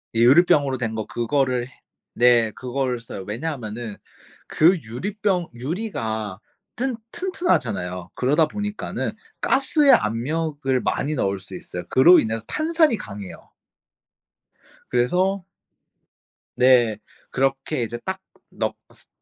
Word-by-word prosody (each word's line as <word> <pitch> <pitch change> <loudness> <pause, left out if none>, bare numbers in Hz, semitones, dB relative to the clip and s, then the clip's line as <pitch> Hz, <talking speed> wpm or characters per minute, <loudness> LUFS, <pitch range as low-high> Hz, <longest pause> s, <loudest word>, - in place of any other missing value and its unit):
예. - - +1
유리병으로 140 +1 +5
된 115 -3 -3
거 110 -1 -3
그거를 125 0 0
해 - - -19 0.4
네 120 -2 +4
그거를 125 +1 -2
써요. 115 -4 -8
왜냐하면은 115 -3 -5 0.5
그 175 +4 +4
유리병 180 - -2
유리가 115 - -3 0.4
튼 260 +1 -1 0.2
튼튼하잖아요. 105 - -1
그러다 150 +5 +2
보니까는 205 +4 -4 0.3
가스의 275 +1 +4
압력을 135 +4 0
많이 150 +2 -1
넣을 100 -6 0
수 95 0 -9
있어요. 90 0 -7
그로 175 +8 +7
인해서 110 0 -2
탄산이 315 -5 +2
강해요. 100 - -9 1.4
그래서 180 +11 +1 1.1
네. 125 -4 +5 0.3
그렇게 135 +1 0
이제 115 +1 -4
딱 190 0 -2 0.3
넣 - - -2 0.2
스 - - -18
130 Hz, 255 characters per minute, -23 LUFS, 115-175 Hz, 1.4 s, 그로